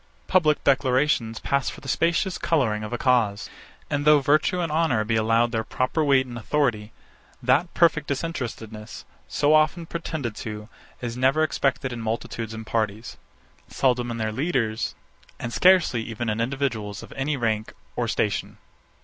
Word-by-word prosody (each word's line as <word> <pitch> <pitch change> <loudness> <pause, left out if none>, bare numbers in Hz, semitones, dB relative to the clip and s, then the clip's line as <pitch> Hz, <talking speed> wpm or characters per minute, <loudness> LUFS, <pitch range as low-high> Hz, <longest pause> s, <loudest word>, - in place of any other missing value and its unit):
Public 155 -6 +2
declarations 130 -4 +2
pass 140 -2 0
for - - -9
the 135 - -11
specious 170 +6 +1
colouring 130 -10 +1
of 105 - -6
a 120 - -1
cause. 120 -6 +1 0.4
And 145 -1 -1
though 150 0 +6
virtue 155 +6 +2
and 170 -3 -1
honour 155 -8 +2
be 110 +1 -1
allowed 115 +2 +2
their 110 -1 -1
proper 130 +7 -1
weight 135 -2 +4
and 120 -2 -7
authority, 115 -5 0 0.5
that 135 +8 +2
perfect 160 -4 +3
disinterestedness, 115 -8 -5 0.2
so 145 +1 +2
often 155 +2 +3
pretended 160 -8 -4
to, 105 0 -6 0.3
is 120 -2 -4
never 135 +5 +3
expected 135 -3 0
in 120 - -5
multitudes 110 0 -4
and 110 0 -7
parties; 110 0 -2 0.5
seldom 125 -2 +1
in 115 - -4
their 110 -1 -1
leaders; 120 -4 -1 0.4
and 120 - -5
scarcely 180 -9 +4
even 115 0 -4
in 110 +2 -2
individuals 115 -5 -2
of - - -12
any 140 +2 -1
rank 110 -3 -1 0.2
or - - -1
station. - - -1
125 Hz, 160 wpm, -24 LUFS, 110-150 Hz, 0.5 s, though